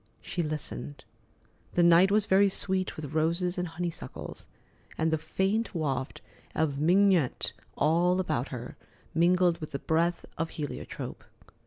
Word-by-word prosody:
She 175 - -3
listened. 135 - -4 0.7
The 175 - +5
night 170 +2 +7
was 210 +1 +3
very 195 +1 +5
sweet 190 -1 -2
with 150 -1 -7
roses 170 +3 +1
and 180 - -1
honeysuckles 170 +1 -6 0.5
and 160 -1 +1
faint 195 +6 0
waft 135 -5 -2 0.3
of 145 -3 0
mignonette 180 -2 +3 0.2
all 175 +4 +3
about 135 -8 -1
her, 125 -2 -7 0.4
mingled 175 +1 +3
with 155 - -6
the - - 0
breath 170 +4 0
of 165 0 0
heliotrope. 150 -2 -5
170 Hz, 130 wpm, -29 LUFS, 155-180 Hz, 0.7 s, night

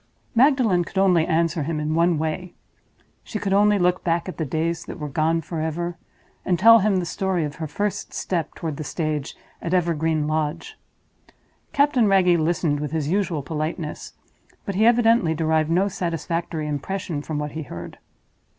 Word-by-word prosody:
Magdalen 240 -8 +4
could 190 - -9
only 180 -4 +4
answer 165 0 +1
him 155 +2 -2
in 150 +1 -1
one 170 0 +3
way. 160 +3 -3 0.7
She 215 - -5
could 195 -2 -1
only 205 +1 +4
look 180 -1 +1
back 170 0 0
at 185 - -6
the 160 - -1
days 160 +4 -2
that - - -7
were 150 - -5
gone 160 +3 +1
forever, 165 +2 -3 0.5
and 180 -2 +1
tell 230 +6 +8
him 205 -1 +2
the 180 -2 0
story 185 0 -1
of 150 0 -7
her 160 -1 -4
first 205 +7 -3
step 170 -4 -3
toward 160 -4 -4
the 155 - -4
stage 150 -2 -3 0.2
at 170 +2 -1
Evergreen 160 -3 +1
Lodge. 155 - -2 1.0
Captain 280 -6 +3
Wragge 180 -3 +4
listened 160 -2 0
with 150 0 -4
his 155 -2 -1
usual 175 -5 0
politeness; 155 +2 -4 0.5
but 200 - -3
he 215 +4 +3
evidently 230 -8 +4
derived 160 -1 +1
no 180 +4 +2
satisfactory 170 -3 -3
impression 150 +2 -3
from 150 +1 -4
what 150 0 -3
he 160 - -5
heard. 100 - -8
170 Hz, 170 wpm, -23 LUFS, 155-190 Hz, 1.0 s, tell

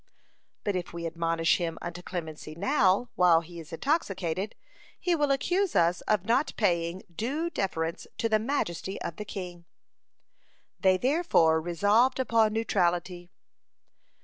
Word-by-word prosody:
But 205 - -1
if 180 -2 -4
we 170 0 -5
admonish 165 0 +1
him 165 -2 -3
unto 175 0 -6
clemency 160 -4 -6
now, 205 - +2
while 175 -2 +5
he 170 +1 -11
is 160 +1 -11
intoxicated, 195 - -1 0.4
he 355 - +1
will 295 -2 +1
accuse 355 +7 +1
us 170 +1 +3
of 210 -3 +1
not 250 +7 +1
paying 175 -3 0
due 290 - -2
deference 165 - -2
to 230 - 0
the 215 -1 +2
majesty 210 - -2
of 165 - -5
the 210 - -5
king. 180 -4 -7 1.1
They 190 -1 +4
therefore 245 - +3
resolved 205 +10 +2
upon 225 -4 +3
neutrality. 180 -5 0
185 Hz, 135 wpm, -28 LUFS, 170-230 Hz, 1.1 s, while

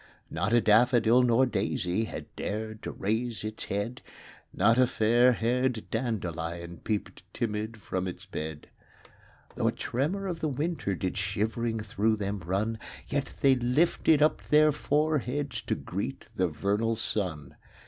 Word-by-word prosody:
Not 95 +6 -1
a 120 - +6
daffodil 115 +2 +5
nor 125 +1 +4
daisy 105 -2 -1
Had - - -8
dared 110 +1 -4
to - - -5
raise 110 +3 -2
its 110 0 -4
head; 105 +6 -3 0.5
Not 110 +6 +3
a 130 - +6
fairhaired 120 +1 +2
dandelion 85 -7 -3
Peeped 105 +3 -3
timid 110 0 -2
from 95 -2 -3
its 90 +1 -7
bed; 80 -5 -5
THE - - -20
CROCUSES. - - -28
5 - - -22
Though - - +1
a - - +4
tremor 160 +11 -2
of 175 -3 -3
the 160 - 0
winter 145 - -2
Did 90 +1 -3
shivering 110 +3 -1
through 110 +1 +1
them 100 -1 -3
run; 105 +6 -1 0.3
Yet 140 -2 -1
they 135 -1 +6
lifted 145 +4 +3
up 155 - +2
their 150 0 +5
foreheads 145 -2 0
To - - -1
greet 105 +9 -5
the 95 - +2
vernal 100 +8 0
sun. 80 -10 -2
110 Hz, 150 wpm, -29 LUFS, 100-125 Hz, 0.5 s, a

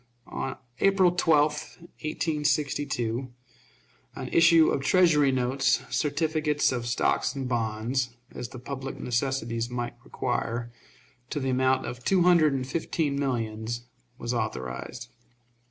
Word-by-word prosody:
On 130 - -4 0.2
April 195 -2 +4
12, 155 -4 +4 0.5
1862, 145 -6 -1 0.8
an - - -5
issue 165 -1 +6
of 135 - 0
Treasury 150 -2 +4
notes, 130 +1 +1
certificates 150 -1 +1
of 120 -2 -3
stock 120 - +1
and 135 -2 -3
bonds, 120 +2 -1 0.2
as 120 - -6
the 130 - -9
public 135 +2 -6
necessities 120 -2 -1
might 120 -1 -3
require, 120 +1 -2 0.6
to - - -2
the 130 -1 -1
amount 130 +1 +2
of 120 0 -6
two 185 +3 +3
hundred 170 -5 +5
and 130 -1 -1
fifteen 145 0 -1
millions, 115 -3 -2 0.3
was 120 +1 -3
authorized. 110 - -4
130 Hz, 120 wpm, -27 LUFS, 120-150 Hz, 0.8 s, issue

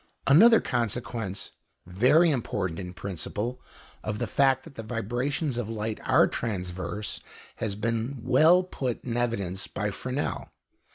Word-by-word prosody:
Another 225 +12 +7
consequence, 115 -3 -2 0.3
very 125 - +4
important 95 - -2
in 90 -2 -6
principle, 100 +6 -4 0.4
of 105 -1 -3
the - - -1
fact 135 -1 +2
that 115 - -7
vibrations 125 +5 -2
of 115 -3 -3
light 110 -1 -3
are - - +5
transverse, 95 -1 -4 0.4
has 105 -3 -2
been 115 +5 -2
well 160 +8 +5
put 130 -9 -4
in 120 -2 -3
evidence 100 -6 -1
by 105 0 -2
Fresnel. 130 +7 -3
115 Hz, 125 wpm, -27 LUFS, 100-130 Hz, 0.4 s, Another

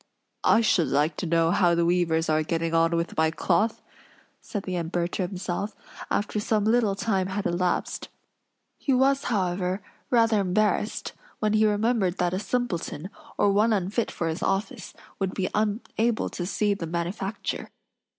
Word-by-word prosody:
"I 225 - +6
should 185 -7 +3
like 150 +2 +1
to 180 - -3
know 165 0 +3
how 175 -2 +3
the 170 0 +2
weavers 170 -2 +2
are 155 0 +2
getting 165 +1 -1
on 165 +1 +3
with 170 +1 -2
my 160 0 +3
cloth," 215 +7 0 0.6
said 205 -3 -5
the 185 - -3
Emperor 170 0 -1
to 180 0 -2
himself, 185 +2 -4 0.3
after 210 +1 0
some 210 0 +1
little 220 -3 +3
time 195 -3 0
had 195 +1 -3
elapsed; 175 0 -1 0.7
he 275 - +1
was, 270 +2 +3
however, 185 -2 -1 0.3
rather 230 -4 +4
embarrassed, 210 +3 0 0.2
when 215 0 0
he 215 0 +4
remembered 210 -3 +1
that 175 0 0
a 185 - 0
simpleton, 195 -7 -3 0.3
or 205 - +4
one 215 +3 +3
unfit 205 +4 0
for 170 - -3
his 160 +2 -3
office, 205 +2 -2 0.2
would 190 -1 -1
be 185 -2 -1
unable 220 +2 0
to 175 - -4
see 205 +1 +1
the 180 -4 -5
manufacture. 175 +5 -3
190 Hz, 160 wpm, -26 LUFS, 175-215 Hz, 0.7 s, I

